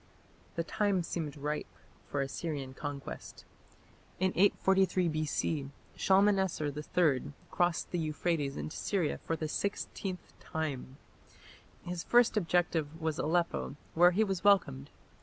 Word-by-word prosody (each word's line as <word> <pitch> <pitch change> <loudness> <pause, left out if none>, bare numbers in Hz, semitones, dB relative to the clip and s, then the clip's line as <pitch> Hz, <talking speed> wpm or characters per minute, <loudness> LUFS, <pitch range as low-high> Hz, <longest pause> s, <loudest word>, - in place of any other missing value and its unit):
The 165 - 0
time 200 0 +1
seemed 155 -4 -4
ripe 150 +1 -2 0.4
for 140 - -1
Assyrian 135 -1 -4
conquest. 145 0 -7 0.7
In 185 0 +2
843 190 -1 +3
B.C. 155 -2 -1 0.3
Shalmaneser 190 -6 +3
III 150 -2 +1 0.2
crossed 175 -1 +1
the 175 - 0
Euphrates 155 -2 -1
into - - -5
Syria 185 -7 -1
for 165 - -2
the 155 -1 -3
sixteenth 190 +1 -3
time. 140 -4 -4 0.9
His 175 -1 -4
first 240 -1 +4
objective 165 -4 +1
was 160 -2 -1
Aleppo, 170 -2 0 0.2
where 175 +2 +7
he 195 +5 +2
was 195 -4 -2
welcomed. 185 - +3
165 Hz, 120 wpm, -32 LUFS, 150-185 Hz, 0.9 s, where